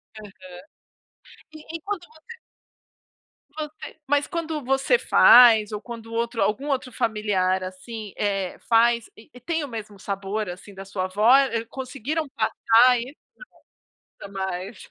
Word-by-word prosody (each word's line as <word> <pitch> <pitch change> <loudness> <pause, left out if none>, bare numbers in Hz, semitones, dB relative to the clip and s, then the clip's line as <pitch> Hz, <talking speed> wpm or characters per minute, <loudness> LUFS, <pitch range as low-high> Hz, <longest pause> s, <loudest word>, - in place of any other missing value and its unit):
Aham. 210 -2 -11 1.2
E 315 +1 -9
e - - -11
quando 400 -4 -4
você 315 +10 -14 1.2
você 305 0 -8
mas 290 0 +1
quando 320 -4 -4
você 270 - +2
faz 225 -4 +7
ou 210 0 -5
quando 230 -1 -9
outro 230 0 -2
algum 265 +8 0
outro 260 -2 -2
familiar 195 -5 0
assim, 205 +3 -8
eh, 195 -3 -2
faz 235 0 +3
e 250 +3 -16
tem 325 +2 -2
o - - -5
mesmo 215 -4 -8
sabor 200 +1 -4
assim 190 +3 -10
da 195 +1 -9
sua 185 -1 -3
avó, 210 +7 +4
eh, 230 -5 0
conseguiram 275 +5 -4
passar 245 0 +3
isso? 260 +5 -8 1.1
Jamais. 190 +1 -6
230 Hz, 135 wpm, -24 LUFS, 205-275 Hz, 1.2 s, faz